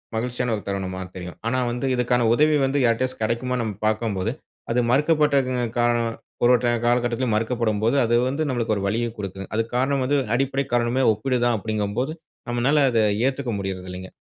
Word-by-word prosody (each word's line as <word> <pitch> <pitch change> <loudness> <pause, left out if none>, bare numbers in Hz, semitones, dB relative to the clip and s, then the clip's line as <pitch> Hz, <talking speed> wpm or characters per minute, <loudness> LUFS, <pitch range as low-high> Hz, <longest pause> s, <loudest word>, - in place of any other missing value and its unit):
மகிழ்ச்சியான 125 +1 -1
ஒரு 105 - -6
தருணமா 95 -1 -3
தெரியும். 90 -3 -8
ஆனா, 130 - +1
வந்து 120 +3 -3
இதுக்கான 125 -1 +1
உதவி 150 +4 +4
வந்து 135 +2 0
யார்ட்டயாச்சும் 125 +2 0
கெடைக்குமான்னு 120 +2 -1
நம்ம 110 -3 -4
பார்க்கும்போது, 110 -4 -1 0.4
அது 120 - +2
மறுக்கப்பட்ட 150 +1 +3
க - - -1 0.3
காரணம் 120 -1 +2 0.3
ஒரு, 120 - +6
ஒரு 125 0 +2 0.2
காலகட்டத்துல 120 +1 +1
மறுக்கப்படும்போது, 115 0 0
அது 115 +1 +2
வந்து 150 +4 -1
நம்மளுக்கு 115 -3 0
ஒரு 100 - -3
வலிய 115 +3 0
குடுக்கும். 95 -2 -6
அதுக்கு 115 +1 -1
காரணம் 135 +1 +1
வந்து 145 +2 +2 0.2
அடிப்படை 135 +1 0
காரணமே 120 +2 +2
ஒப்பீடு 125 +4 -1
தான் 120 -1 +2
அப்பிடிங்கம்போது, 110 +6 -2 0.4
நம்மனால 135 +5 +2
அத 115 - +2 0.3
ஏத்துக்க 135 -2 -2
முடியறதில்லங்க. 95 -1 -6
120 Hz, 165 wpm, -23 LUFS, 110-130 Hz, 0.4 s, ஒரு